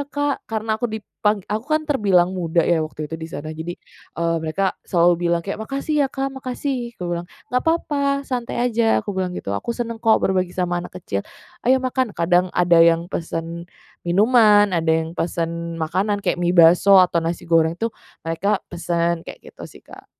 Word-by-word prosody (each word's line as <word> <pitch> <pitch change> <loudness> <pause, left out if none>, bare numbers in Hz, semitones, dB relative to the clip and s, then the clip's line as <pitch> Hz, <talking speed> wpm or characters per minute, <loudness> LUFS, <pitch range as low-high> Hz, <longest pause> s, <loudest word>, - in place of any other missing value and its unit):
Kak!" 290 -1 -1
karena 220 0 -2
aku 240 - 0
dipang 210 -2 -2
aku 215 +3 -3
kan 310 - -4
terbilang 195 - +2
muda 170 -2 0
ya 170 -2 +2
waktu 155 0 -5
itu 160 +2 -7
di 160 - -6
sana. 155 -1 -6
Jadi, 160 +2 -6 0.4
eee, 165 0 0
mereka 175 +5 -1
selalu 175 0 +2
bilang 170 0 +2
kayak, 200 +2 -4
"Makasih 275 +6 -3
ya 280 - +3
Kak, 270 +1 -3
makasih," 255 -2 -4
aku 180 - -6
bilang, 170 +1 -4 0.2
"nggak 250 - +3
papa 280 -4 0
santai 245 -4 -4
aja," 230 -2 +2
aku 205 - -3
bilang 185 -1 -3
gitu, 100 - -4
"aku 230 - -3
senang 230 -2 -4
kok 225 -1 +3
berbagi 185 -2 0
sama 175 -1 0
anak 180 +1 -9
kecil, 100 - -3 0.5
ayo 260 - +6
makan." 255 -3 -1
Kadang 175 +2 +2
ada 175 -2 +3
yang 165 0 +5
pesen 165 +1 -5 0.4
minuman, 210 0 +5
ada 165 -1 0
yang 160 0 +1
pesen 170 0 -3
makanan, 190 +6 -1
kayak - - 0
mie 175 +1 +1
bakso 175 +4 +7
atau 180 -2 +4
nasi 165 +1 -3
goreng 165 0 +2
tuh 225 +3 -2 0.3
mereka 195 +6 0 0.2
pesen, 170 -1 -1
kayak - - -12
gitu - - -10
sih - - -17
Kak. - - -14
180 Hz, 185 wpm, -21 LUFS, 170-225 Hz, 0.5 s, bakso